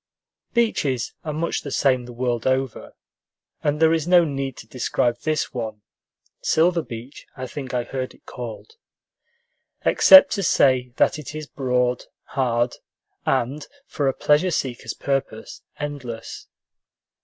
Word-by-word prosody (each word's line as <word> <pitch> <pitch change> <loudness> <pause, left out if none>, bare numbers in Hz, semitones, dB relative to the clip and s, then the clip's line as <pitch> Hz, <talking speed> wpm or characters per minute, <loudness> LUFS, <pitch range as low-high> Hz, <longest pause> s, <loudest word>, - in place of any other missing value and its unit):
Beaches 145 - +1
are 155 - -3
much 160 +3 -2
the 145 - -6
same 130 -2 +2
the 120 - -9
world 120 -1 -1
over, 130 -2 -1 0.7
and 150 0 0
there 160 0 +5
is 165 -1 0
no 175 -1 +6
need 135 -3 -3
to - - -10
describe 120 0 0
this 155 +2 -1
one 110 -4 -5 0.6
Silver 170 +1 +3
Beach, 120 +1 -9
I 130 - -4
think 130 0 -6
I 120 - +1
heard 130 +1 -5
it - - -27
called 125 - -8 1.1
except 285 0 +8
to 200 - -1
say 130 -8 +3
that 155 - +2
it 150 0 -8
is 155 0 -5
broad, 125 -3 0 0.2
hard, 120 -2 0 0.5
and, 135 +3 0 0.2
for 145 - -2
a 135 - +2
pleasure 150 +5 +3
seeker's 130 -7 -3
purpose, 135 -5 -3 0.2
endless. 140 -6 -6
135 Hz, 140 wpm, -23 LUFS, 125-150 Hz, 1.1 s, except